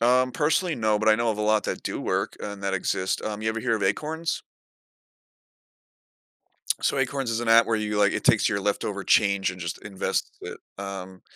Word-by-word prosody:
Um, 125 +2 +3
personally, 160 +2 +1
no, 110 -2 +1
but 110 - +1
I 110 - +7
know 115 0 +1
of 110 - -2
a - - 0
lot 110 0 +2
that - - -3
do - - -3
work - - -1
and 100 -1 -6
that 100 - -1
exist, 95 0 -1
um, 105 0 -4
you 110 - 0
ever 115 0 -3
hear 115 0 +1
of 105 - -5
acorns? 160 +10 -1 2.4
So - - +1
Acorns 135 -1 -1
is 115 0 -1
an 120 - -3
app 115 +1 +7
where 115 - +1
you, 105 -1 -2
like, 100 -1 +4
it - - -3
takes - - +4
your 100 -2 -1
leftover 100 0 -2
change 100 -3 +3
and 90 0 -10
just 85 0 -5
invests 100 -2 -2
it, - - -7 0.2
um, 95 -1 -7
110 Hz, 205 wpm, -25 LUFS, 100-120 Hz, 2.4 s, I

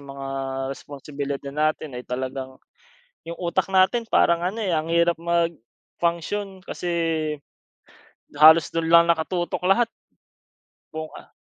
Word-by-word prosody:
mga 135 -1 -8 0.5
responsibility 140 0 -6
natin 150 -3 -1
ay - - -13
talagang 130 +1 -4 0.7
'yung 170 +1 -8
utak 185 +2 -1
natin 190 +5 +3
parang 170 -5 +2
ano, 195 +5 -2
eh, 205 - -2
ang 160 +2 -2
hirap 170 0 +3
mag-function 170 - -3
kasi, 180 -1 -6 1.5
halos 160 0 +7
do'n 165 0 -1
lang 170 0 +7
nakatutok 170 +2 -1
lahat. 235 +4 +4 1.1
Buong 160 0 -4
ah - - -13
165 Hz, 115 wpm, -24 LUFS, 145-175 Hz, 1.5 s, halos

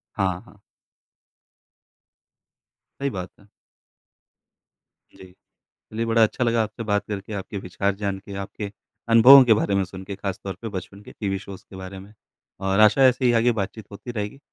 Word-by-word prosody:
हाँ, 95 -3 -1
हाँ। - - -18 2.5
सही 140 - 0
बात 95 -6 -6
है। 100 - -21 1.7
जी। 95 -1 -14 0.6
चलिए 115 +1 -2
बड़ा 115 0 +4
अच्छा 110 +3 0
लगा 115 -1 +2
आपसे 110 +2 -6
बात 105 -2 0
करके, 105 0 -6
आपके 100 +1 -5
विचार 100 +1 -2
जान 100 -1 -3
के, 100 +1 -11
आपके 100 +1 -6 0.4
अनुभवों 125 +4 +9
के 115 - +6
बारे 100 -2 0
में 100 - +2
सुन 95 +1 -10
के 100 +1 -6
खासतौर 95 0 -5
पे 115 - -5
बचपन 100 0 -8
के - - -12
टीवी 95 -2 -3
शोज़ 95 -1 -11
के - - -12
बारे 95 0 -8
में। 100 +2 -14 0.5
और 95 +1 0
आशा 110 +5 +6
ऐसे 130 +1 +1
ही 120 - +5
आगे 120 +1 +3
बात-चीत 110 +1 -6
होती 110 +4 -8
रहेगी। 105 +3 -5
100 Hz, 170 wpm, -23 LUFS, 95-115 Hz, 2.5 s, अनुभवों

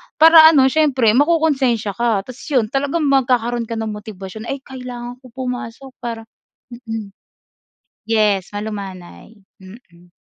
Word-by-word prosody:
para 320 0 +8
ano 295 -5 +5
siyempre 270 -8 +3
mako-konsensiya 270 -6 +2
ka 225 -5 0
tapos 255 +2 -11
'yon 245 -7 0
talagang 285 +4 -1
magkakaroon 245 -4 +1
ka 230 - -4
ng 220 -1 -3
motibasyon, 210 0 -9
"Ay 275 0 -5
kailangan 250 -2 -8
ko 255 - -16
pumasok 250 0 -6
para" 230 -1 -6 0.5
mm. 225 -4 -7 1.0
Yes, 210 -4 +1
malumanay. 200 -1 -8 0.2
Mm. 180 -3 -16
240 Hz, 125 wpm, -19 LUFS, 215-265 Hz, 1.0 s, para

